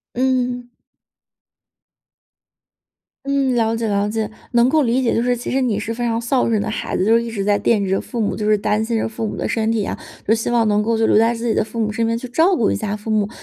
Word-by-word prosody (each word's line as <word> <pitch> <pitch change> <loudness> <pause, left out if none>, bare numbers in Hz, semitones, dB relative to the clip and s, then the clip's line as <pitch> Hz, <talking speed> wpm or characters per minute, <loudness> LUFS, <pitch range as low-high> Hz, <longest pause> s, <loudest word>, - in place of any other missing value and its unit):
嗯。 250 -1 0 2.6
嗯， 275 -2 +1
了 225 -1 +1
解 230 0 -2
了 205 -1 0
解。 215 0 -2 0.2
能 240 0 +4
够 310 +2 +3
理 250 +1 +1
解 245 - +1
就 230 - +1
是 245 0 +1
其 240 - -5
实 265 - +1
你 235 -6 0
是 215 +2 -3
非 235 +1 -5
常 230 -1 0
孝 240 +2 0
顺 220 -2 +1
的 220 - -3
孩 215 - -3
子， 185 - +1
就 225 +3 +4
一 235 0 -3
直 205 -3 -3
在 205 0 +2
惦 210 -4 +1
记 190 - -3
着 195 - +1
父 240 - -7
母， 215 -3 0
就 210 -1 -2
是 215 - +5
担 210 +1 0
心 225 +1 -1
着 220 - 0
父 225 0 -4
母 - - -5
的 - - -2
身 225 -1 0
体 225 -3 0
啊， - - -4 0.3
就 220 - +4
希 225 - -2
望 235 -2 +2
能 210 0 +2
够 225 +1 0
留 220 -1 +3
在 230 +2 +3
自 235 +1 -4
己 230 - +2
的 - - +1
父 225 +2 -7
母 215 -2 0
身 225 +1 0
边 230 - 0
去 235 - -6
照 335 +9 +3
顾 220 - +2
一 - - 0
下 210 -1 -3
父 210 +1 -7
母。 210 -2 +1
225 Hz, 285 characters per minute, -20 LUFS, 215-240 Hz, 2.6 s, 是